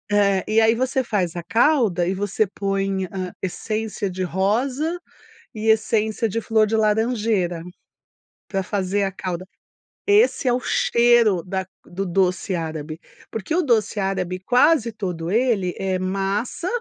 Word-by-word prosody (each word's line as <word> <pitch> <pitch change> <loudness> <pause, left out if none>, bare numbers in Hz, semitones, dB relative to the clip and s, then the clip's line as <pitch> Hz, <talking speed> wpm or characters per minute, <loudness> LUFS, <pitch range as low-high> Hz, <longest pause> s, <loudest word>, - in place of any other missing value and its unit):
eh, 200 -2 +3
e 220 +1 +3
aí 225 0 +5
você 260 +2 0
faz 185 -8 -1
a 175 - -4
calda 225 - +2
e 185 - 0
você 205 +2 0
põe, 195 -1 -2
hã, 185 -1 -5
essência 215 +2 -3
de 185 0 -4
rosa 250 - 0 0.6
e 220 0 -3
essência 220 0 +2
de 230 +3 -2
flor 220 -1 +2
de 215 - -2
laranjeira, 215 -5 +1 0.9
pra 195 -1 -2
fazer 200 +1 -1
a 195 - -1
calda. 185 -1 -5 0.6
Esse 415 - +3
é 245 - +4
o 245 - +1
cheiro 235 -8 +3
da 190 0 -3 0.2
do 195 +3 -4
doce 185 +1 0
árabe. 160 -1 -5 0.3
Porque 225 +7 -4
o 360 - +3
doce 230 -7 +1
árabe 185 -2 -2
quase 245 - +3
todo 180 -6 -4
ele 215 -6 +1
é 190 -1 -1
massa 195 - -2
200 Hz, 145 wpm, -22 LUFS, 185-225 Hz, 0.9 s, aí